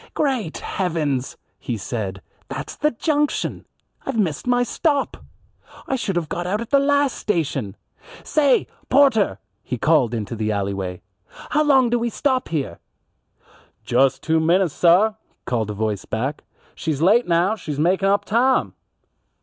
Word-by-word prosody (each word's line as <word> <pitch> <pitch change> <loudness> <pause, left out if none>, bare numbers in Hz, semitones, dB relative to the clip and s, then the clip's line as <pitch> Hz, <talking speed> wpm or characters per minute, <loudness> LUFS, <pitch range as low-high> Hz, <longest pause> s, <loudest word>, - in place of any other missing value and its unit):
"Great 255 - -1
heavens!" 155 -8 -2 0.2
he 120 - -3
said, 100 -2 -4 0.3
"that's - - -6
the 300 - +2
junction. 295 +3 -1 0.4
I've - - -3
missed 175 - -1
my 245 0 +3
stop. 285 +2 0 0.7
I 270 - -1
should 205 -7 -2
have 170 -3 -1
got 175 +3 -3
out 205 +3 0
at 235 +2 -7
the 280 - +5
last 285 -1 +2
station. 140 - -2 0.5
Say, 285 -4 +3 0.2
porter," 255 - +4 0.2
he 125 - -4
called 125 -4 +2
out - - 0
into 105 +1 -4
the 110 -1 -1
alleyway, 95 -3 -3 0.5
"how 300 - +3
long 265 -5 +4
do 240 - +2
we 235 +1 -1
stop 260 +2 0
here?" 140 - -3 1.0
"Just 130 +2 +2
two 160 0 +2
minutes, 170 +1 +2
sah," 185 +6 +4 0.3
called 115 -4 -1
a - - -2
voice 105 -2 -2
back. 130 +7 -3 0.3
"She's 155 -2 -2
late 220 +7 +4
now, 175 +5 +2
she's 150 -9 -6
makin' 185 +5 +2
up 200 +1 +2
tahm!" 250 +4 +2
175 Hz, 150 wpm, -22 LUFS, -, 1.0 s, the